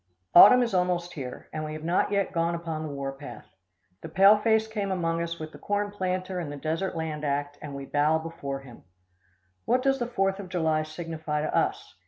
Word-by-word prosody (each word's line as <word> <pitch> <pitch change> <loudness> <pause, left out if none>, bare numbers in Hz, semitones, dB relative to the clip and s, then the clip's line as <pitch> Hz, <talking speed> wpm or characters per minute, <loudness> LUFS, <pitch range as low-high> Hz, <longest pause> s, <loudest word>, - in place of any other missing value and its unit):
Autumn 245 +8 +9
is 230 - -2
almost 180 -1 0
here, 130 -4 -7
and 155 0 -3
we 155 0 -5
have 155 0 -7
not 170 +5 +1
yet 200 -1 0
gone 170 0 0
upon 165 -2 -4
the 155 - -4
war 140 -1 -4
path. 140 +1 -10 0.6
The 160 - -8
pale 195 +5 +7
face 220 +1 +2
came 210 -3 -3
among 165 -2 -1
us 170 0 -3
with 155 -1 -7
the - - -13
corn 205 0 -1
planter 185 -1 -2
and 160 -4 -4
the 145 - -6
Desert 165 +6 -2
Land 155 -2 -4
Act, 145 0 -2
and 145 -2 -7
we 140 0 -6
bow 150 +3 +2
before 160 -4 -5
him. 125 -4 -14 0.8
What 255 0 +2
does 270 0 +2
the 240 - -1
Fourth 195 -5 0
of 190 -3 -7
July 160 -4 +1
signify 155 -1 -4
to - - -2
us? - - -1
165 Hz, 215 wpm, -27 LUFS, 155-190 Hz, 0.8 s, Autumn